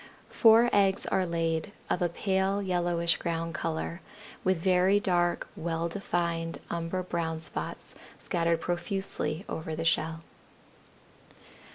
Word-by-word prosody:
Four 230 +1 +6
eggs 195 -1 +3
are 185 -1 +1
laid, 165 +3 -1
of 180 - 0
a 175 - +2
pale 190 +2 0
yellowish 175 -3 +1
ground 165 0 -2
color, 165 +2 -3 0.4
with 185 -1 +2
very 185 +3 +4
dark, 175 -3 +1
well 165 0 -2
defined 170 -2 -2
umber 170 +2 -2
brown 165 -2 -2
spots 160 - -6 0.2
scattered 170 -1 0
profusely 180 -1 -2
over 160 0 -4
the 165 +1 -3
shell. 165 0 +1
170 Hz, 115 wpm, -29 LUFS, 165-190 Hz, 0.4 s, Four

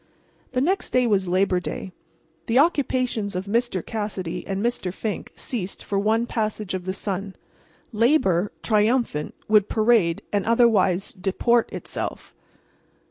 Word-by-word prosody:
The 255 - +1
next 370 +8 0
day 250 -1 +4
was 200 -5 +2
Labor 185 0 +2
Day. 185 +1 -6 0.6
The 230 - +2
occupations 255 - +1
of 185 +1 -2
Mr. 225 -3 0
Cassidy 205 -6 -4
and 195 0 -2
Mr. 235 -6 -1
Fink 210 +2 -4
ceased 215 -9 -5
for 200 - -1
one 220 +3 +2
passage 215 -4 -2
of 185 -1 -4
the 185 - -1
sun. 195 0 -4 0.6
Labor, 210 - +3
triumphant, 215 - +1
would 210 -2 +4
parade 215 -7 +3
and 205 -1 +2
otherwise 220 -5 +3
disport 210 +5 +1
itself. - - -6
210 Hz, 135 wpm, -24 LUFS, 190-235 Hz, 0.6 s, day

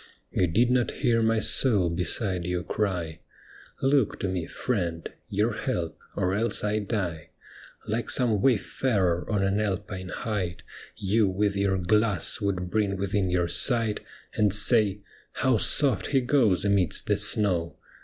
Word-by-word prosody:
You 90 - +1
did 115 +9 +2
not 125 -1 +2
hear 115 -3 +3
my 115 0 +2
soul 110 -3 +4
beside 90 +1 -1
you 90 0 -2
cry, 85 -7 -3 0.3
' - - -21 0.3
Look 135 -4 +2
to 95 - -1
me, 90 -3 -3
friend; 85 -9 -3 0.2
your 105 +4 0
help, 85 - -3 0.2
or 95 -1 0
else 110 +2 -1
I 105 +1 0
die.' 95 -6 -4 0.6
Like 110 +2 -2
some 115 -6 +1
wayfarer 100 -7 0
on 100 -2 +1
an 100 +1 +1
Alpine 95 -2 -3
height, 90 -6 -4 0.3
You 105 +2 +1
with 100 +2 0
your 100 -1 +1
glass 100 0 +1
would 90 -3 -2
bring 100 -3 0
within 95 0 -1
your 90 -1 +1
sight 115 +2 +1 0.3
And 105 -2 +2
say, 105 0 +3 0.2
* - - -31
How 130 -3 +3
soft 135 0 +2
he 135 -2 +2
goes 120 -8 +2
amidst 100 -4 +1
the 105 - +1
snow 100 -5 +1
100 Hz, 155 wpm, -26 LUFS, 90-110 Hz, 0.6 s, soul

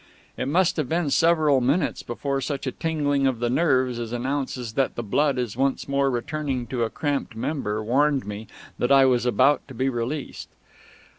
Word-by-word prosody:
It 125 - -3
must 175 +5 +2
have 150 -5 -1
been 165 -3 0
several 155 -5 +3
minutes 140 +7 +1
before 135 +3 -3
such 140 0 -3
a 130 - -1
tingling 145 -4 0
of 130 -3 0
the 120 +1 -1
nerves 130 -5 +2
as 115 -1 -5
announces 125 -2 -3
that 135 +2 0
the 120 - -4
blood 140 +6 +1
is 120 -4 -2
once 135 +2 0
more 140 0 +1
returning 130 0 -2
to 125 - -1
a 115 - -1
cramped 145 -5 -2
member 110 -4 -2
warned 135 +4 +2
me 105 +1 -7 0.3
that 120 - +1
I 135 -1 +7
was 125 -1 +2
about 130 +3 +3
to 130 - -11
be 130 +3 0
released. 130 +4 -4
135 Hz, 190 wpm, -24 LUFS, 120-145 Hz, 0.3 s, I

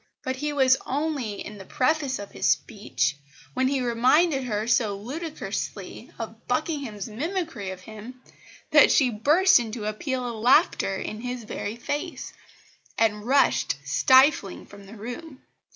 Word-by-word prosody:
But 260 0 -3
he 295 +2 -2
was 265 -2 +4
only 275 -7 -3
in 210 -1 -9
the - - -8
preface 270 +5 0
of 205 0 -9
his - - -1
speech, 145 -9 0 0.4
when 260 0 +1
he 270 -1 0
reminded 260 +5 +3
her 215 -3 -2
so 225 -4 +1
ludicrously 300 +10 -6
of - - -8
Buckingham's 270 - -2
mimicry 295 - -4
of 190 -1 -7
him 220 +6 -11 0.5
that - - +7
she 260 -5 +4
burst 300 - +4
into 225 -2 -5
a 215 - -1
peal 255 +2 -3
of 230 -2 -6
laughter 250 - +3
in 215 +3 -5
his 250 -1 -5
very 210 0 -5
face, 290 +8 -5 0.6
and 210 -2 +1
rushed 275 - +3
stifling 260 - +3
from 200 -1 -14
the 215 - -11
room. 245 +7 -8
250 Hz, 150 wpm, -25 LUFS, 215-280 Hz, 0.6 s, that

